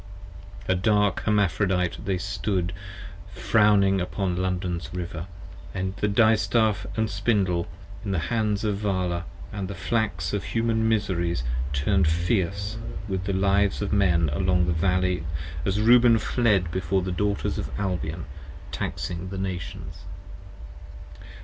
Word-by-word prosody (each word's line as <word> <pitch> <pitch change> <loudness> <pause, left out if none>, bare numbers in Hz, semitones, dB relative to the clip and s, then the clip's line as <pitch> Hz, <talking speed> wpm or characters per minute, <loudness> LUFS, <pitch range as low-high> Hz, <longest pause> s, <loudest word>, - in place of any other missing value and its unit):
A 95 - +3
dark 105 +1 +2
Hermaphrodite 95 -3 +1
they 95 -2 0
stood 95 -1 -2 0.6
frowni(ni)ng 100 -3 +4
upon 90 0 -2
London's 90 -1 -2
River: 85 -1 -5 0.5
And 95 +1 -2
the 105 - 0
Distaff 110 0 +3
& 110 - +2
Spindle 95 -7 0 0.4
in 100 - -4
the 95 - 0 0.2
hands 110 -2 0
of 105 -2 0
Vala, 90 -4 -1 0.3
with 100 -2 -3
the 100 - -6
Flax 85 -5 -1
of 100 - -1
Human 115 -1 +1
Miseries, 90 - 0 0.3
turn'd 85 +6 +2
fierce 95 +5 0 0.3
with 95 -2 -2
the 100 - -1
Lives 100 +1 +2
of 100 - -2
Men 85 -6 +3
along 90 0 +2
the 85 - +1
Valley, 90 +1 +1 0.4
As 95 +2 +1
Reuben 120 +1 +6
fled 105 -7 +1
before 95 +1 0
the 95 - -2
Daughters 100 +3 -1
of - - -4
Albion, 85 -4 -2 0.5
Taxing 90 +1 -4
the 95 - -5
Nations. 90 -3 -5
95 Hz, 130 wpm, -25 LUFS, 90-105 Hz, 0.6 s, Reuben